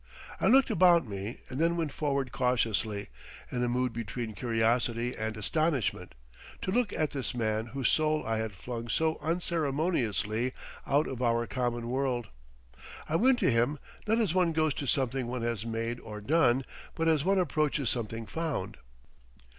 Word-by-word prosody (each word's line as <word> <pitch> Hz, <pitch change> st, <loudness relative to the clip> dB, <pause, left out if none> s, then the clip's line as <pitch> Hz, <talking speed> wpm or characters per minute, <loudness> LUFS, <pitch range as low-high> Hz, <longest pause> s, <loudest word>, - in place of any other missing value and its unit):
I -, -, +2 dB
looked 265 Hz, 0 st, +5 dB
about 175 Hz, -, +5 dB
me 100 Hz, +3 st, -5 dB
and 130 Hz, -, -5 dB
then 170 Hz, +1 st, +2 dB
went 160 Hz, -4 st, -1 dB
forward 140 Hz, -3 st, -1 dB
cautiously, 110 Hz, -4 st, 0 dB, 0.4 s
in 125 Hz, -, -1 dB
a 120 Hz, -, +1 dB
mood 125 Hz, 0 st, 0 dB
between 115 Hz, 0 st, -4 dB
curiosity 115 Hz, +2 st, 0 dB
and 110 Hz, 0 st, -3 dB
astonishment, 145 Hz, -, -1 dB, 0.5 s
to 185 Hz, -, -1 dB
look 240 Hz, -1 st, +1 dB
at 155 Hz, -2 st, 0 dB
this 135 Hz, -3 st, -4 dB
man 110 Hz, -1 st, 0 dB
whose 130 Hz, +1 st, 0 dB
soul 155 Hz, 0 st, +2 dB
I 110 Hz, 0 st, 0 dB
had 110 Hz, -1 st, -2 dB
flung 115 Hz, +5 st, -6 dB
so 160 Hz, +5 st, +1 dB
unceremoniously 145 Hz, -, 0 dB, 0.3 s
out 145 Hz, +3 st, +3 dB
of 130 Hz, -1 st, -5 dB
our 120 Hz, -1 st, +2 dB
common 120 Hz, -1 st, -2 dB
world. 125 Hz, -2 st, -1 dB, 0.8 s
I 155 Hz, -, -1 dB
went 250 Hz, +8 st, +5 dB
to -, -, +4 dB
him, 120 Hz, +6 st, +2 dB, 0.3 s
not 220 Hz, +2 st, +3 dB
as 210 Hz, -8 st, +1 dB
one 180 Hz, -3 st, +3 dB
goes 155 Hz, -2 st, +2 dB
to 140 Hz, -, -4 dB
something 130 Hz, -2 st, 0 dB
one 125 Hz, -1 st, -3 dB
has 115 Hz, -2 st, -2 dB
made 115 Hz, +1 st, -2 dB
or 105 Hz, -1 st, -8 dB
done, 130 Hz, +1 st, +3 dB, 0.3 s
but 165 Hz, 0 st, 0 dB
as 155 Hz, -3 st, +3 dB
one 195 Hz, +3 st, +3 dB
approaches 150 Hz, -6 st, +1 dB
something 115 Hz, -1 st, -3 dB
found. 150 Hz, -, -3 dB
125 Hz, 165 wpm, -30 LUFS, 115-155 Hz, 0.8 s, looked